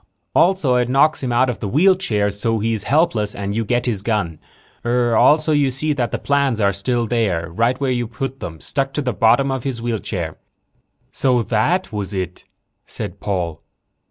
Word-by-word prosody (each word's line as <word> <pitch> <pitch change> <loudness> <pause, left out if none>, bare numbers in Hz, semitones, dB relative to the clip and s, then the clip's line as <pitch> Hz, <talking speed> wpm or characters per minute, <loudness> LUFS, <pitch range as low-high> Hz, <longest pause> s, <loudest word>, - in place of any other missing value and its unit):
Also 170 -9 +3
it 125 0 0
knocks 140 +4 +3
him 130 -2 -2
out 120 +2 +3
of 120 -6 -3
the 105 - -3
wheelchair 140 - +2
so 115 +3 -1
he's 110 -1 -1
helpless 135 -9 +1
and 100 0 -3
you 115 - 0
get 120 +3 0
his 110 -6 -1
gun. 100 -7 -2 0.4
Also 125 +6 +3
you 145 -2 +3
see 150 +4 0
that 125 -4 -1
the - - -2
plans 140 -5 +1
are 100 -2 +2
still 120 +5 -1
there 100 -9 -1
right 115 +7 +1
where 135 -2 0
you 120 -2 -1
put 135 +3 -5
them, 80 -2 -7
stuck 135 - -2
to 150 - 0
the 125 -2 -1
bottom 120 +6 +3
of 130 -2 -3
his 130 -4 -3
wheelchair." 105 -8 -3 0.7
"So 125 -3 +1
that 120 - 0
was 100 -1 -4
it," 90 -2 -4 0.4
said - - -6
Paul. 85 -5 -3
120 Hz, 185 wpm, -20 LUFS, 105-135 Hz, 0.7 s, Also